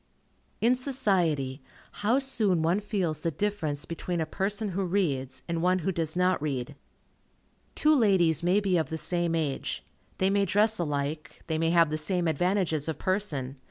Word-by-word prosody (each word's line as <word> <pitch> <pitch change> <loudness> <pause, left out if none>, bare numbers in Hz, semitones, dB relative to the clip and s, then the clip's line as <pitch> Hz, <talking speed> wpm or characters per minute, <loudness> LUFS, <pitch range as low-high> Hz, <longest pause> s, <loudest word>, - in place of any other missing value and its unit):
In 240 +3 +4
society, 180 - 0 0.4
how 220 +5 +3
soon 215 -11 +1
one 170 +5 +2
feels 190 -7 -2
the 165 - -1
difference 165 -6 -2
between 170 +1 -3
a 160 - 0
person 205 +5 -2
who 195 +1 -2
reads, 145 -9 -1
and 170 -1 -2
one 180 +1 +3
who 190 - +2
does 165 -2 -2
not 180 -2 +2
read. 140 -2 -3 1.0
Two 305 0 +4
ladies 185 - +3
may 180 +4 +3
be 195 -3 +1
of 160 - -1
the 160 - -3
same 175 0 0
age. 150 -4 -2 0.3
They 190 +1 +2
may 200 0 +2
dress 210 +3 +2
alike. 150 -1 -3
They 160 -1 -1
may 165 0 +2
have 165 -2 +4
the 155 - 0
same 175 +1 0
advantages 165 -1 +1
of 160 -2 -2
person. 155 -9 -1
175 Hz, 170 wpm, -28 LUFS, 155-200 Hz, 1.0 s, In